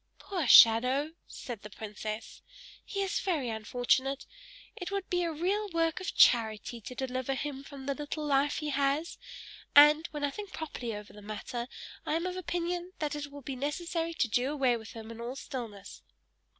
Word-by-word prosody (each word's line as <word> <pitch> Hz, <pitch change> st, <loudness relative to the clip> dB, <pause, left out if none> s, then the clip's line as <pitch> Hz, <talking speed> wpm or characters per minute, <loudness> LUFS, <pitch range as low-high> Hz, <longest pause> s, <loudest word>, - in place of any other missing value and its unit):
"Poor 355 Hz, -9 st, -3 dB
shadow!" 250 Hz, +7 st, +7 dB, 0.2 s
said 235 Hz, -5 st, -7 dB
the 210 Hz, -, -9 dB
princess. 215 Hz, +1 st, -6 dB, 0.4 s
"He 395 Hz, -1 st, -2 dB
is 390 Hz, +1 st, -1 dB
very 310 Hz, -10 st, -1 dB
unfortunate; 245 Hz, +5 st, 0 dB, 0.5 s
it 360 Hz, -, -5 dB
would 395 Hz, -1 st, -3 dB
be 355 Hz, 0 st, +2 dB
a 340 Hz, -1 st, 0 dB
real 385 Hz, +7 st, -1 dB
work 330 Hz, -1 st, +1 dB
of 370 Hz, -, -4 dB
charity 225 Hz, 0 st, +4 dB
to 250 Hz, +5 st, -8 dB
deliver 260 Hz, +1 st, -2 dB
him 275 Hz, 0 st, -4 dB
from 280 Hz, -2 st, -10 dB
the 280 Hz, -, 0 dB
little 295 Hz, +2 st, -4 dB
life 285 Hz, 0 st, +2 dB
he 300 Hz, -, -2 dB
has, 280 Hz, +3 st, 0 dB, 0.6 s
and, 300 Hz, +3 st, +8 dB
when 295 Hz, -1 st, -6 dB
I 285 Hz, -, +1 dB
think 410 Hz, +5 st, -8 dB
properly 245 Hz, -8 st, -4 dB
over 210 Hz, 0 st, -9 dB
the 210 Hz, -, -12 dB
matter, 235 Hz, +4 st, -5 dB, 0.4 s
I 305 Hz, -, -1 dB
am 335 Hz, +2 st, -1 dB
of 365 Hz, 0 st, -2 dB
opinion 350 Hz, 0 st, -3 dB
that 300 Hz, -1 st, -2 dB
it 290 Hz, -1 st, -5 dB
will 285 Hz, -1 st, -10 dB
be 270 Hz, 0 st, -4 dB
necessary 330 Hz, +4 st, -2 dB
to 255 Hz, -, +2 dB
do 245 Hz, +4 st, +1 dB
away 265 Hz, -5 st, +2 dB
with 220 Hz, -1 st, -8 dB
him 225 Hz, 0 st, -8 dB
in 230 Hz, 0 st, -8 dB
all 240 Hz, +2 st, -4 dB
stillness!" 230 Hz, -8 st, -7 dB
280 Hz, 185 wpm, -31 LUFS, 240-330 Hz, 0.6 s, and